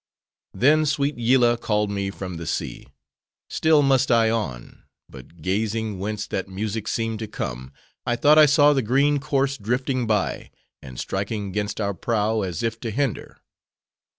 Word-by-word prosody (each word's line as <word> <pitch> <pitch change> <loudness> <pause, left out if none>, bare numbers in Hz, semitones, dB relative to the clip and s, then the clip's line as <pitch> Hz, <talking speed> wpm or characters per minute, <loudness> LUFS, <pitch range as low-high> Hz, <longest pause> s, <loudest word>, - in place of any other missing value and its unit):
Then 155 +4 +4
sweet 145 +1 0
Yillah 120 0 +3
called 105 -2 0
me 100 -1 -2
from 95 -3 -6
the 85 -1 -7
sea;—still 160 -2 -2
must 135 -1 +3
I 115 -2 +4
on! 90 - -4 0.3
but 70 +5 -14
gazing 110 +2 -1
whence 105 +2 -3
that 95 - -4
music 105 +2 -4
seemed 115 -1 -2
to 110 - -4
come, 65 - -6 0.3
I 120 - 0
thought 150 +6 +5
I 155 - +8
saw 145 +1 +5
the 135 - +1
green 140 +5 +2
corse 140 -1 -1
drifting 125 +3 -1
by: 105 -3 -1 0.3
and 65 -2 -10
striking 100 +1 -3
'gainst 105 +1 -3
our 100 -1 -1
prow, 110 +3 0
as 90 -2 -3
if 115 0 -2
to 115 - -4
hinder. 130 +1 -3
110 Hz, 155 wpm, -23 LUFS, 100-135 Hz, 0.3 s, I